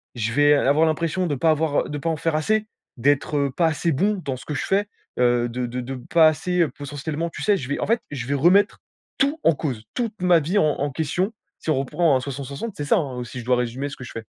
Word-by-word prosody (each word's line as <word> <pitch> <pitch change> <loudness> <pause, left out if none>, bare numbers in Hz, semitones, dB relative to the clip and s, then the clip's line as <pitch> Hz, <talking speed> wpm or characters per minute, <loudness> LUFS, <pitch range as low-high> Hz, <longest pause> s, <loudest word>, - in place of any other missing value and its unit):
je 115 -1 -2
vais 145 +1 +5
avoir 145 +3 +3
l'impression 165 +3 0
de 145 - -1
pas 160 +5 +3
avoir 155 -1 0
de 145 - -3
pas 165 +3 -2
en 160 - -1
faire 160 +1 -1
assez, 215 +7 +1 0.3
d'être, 145 +3 +1
heu, 140 -1 +1
pas 170 -2 +3
assez 160 +1 0
bon 205 +9 +1
dans 135 -2 -2
ce - - -11
que 150 - -4
je - - -2
fais, 200 +1 +1 0.3
heu, 120 -1 +3
de 125 +1 -3
de 125 +2 -4
de 130 +2 -5
pas 160 +6 +4
assez, 175 +3 0
heu, 160 - +3
potentiellement 145 +4 -4
tu - - -9
sais, 205 -1 +4
je 130 -6 -5
vais 145 - -1
en - - -2
fait, 230 +1 +2
je 125 -4 -5
vais 140 - 0
remettre 175 +8 +3 0.4
tout 285 +4 +1
en 165 - +6
cause, 125 -9 -4
toute 225 -6 -3
ma 180 -2 +5
vie, 175 +8 -1
en 200 - +4
en 145 0 -1
question, 165 - -1 0.3
si - - -6
on 150 - +2
reprend 140 +1 +2
à - - -2
60-60 140 - -5
c'est 145 - -4
ça, 210 - +3
hein, 130 -7 -3
si 125 +1 -8
je 120 - -8
dois 125 0 +3
résumer 125 +3 -2
ce 140 - -7
que 130 - -10
je 120 - -9
fais. 115 -1 -7
145 Hz, 265 wpm, -23 LUFS, 130-170 Hz, 0.4 s, en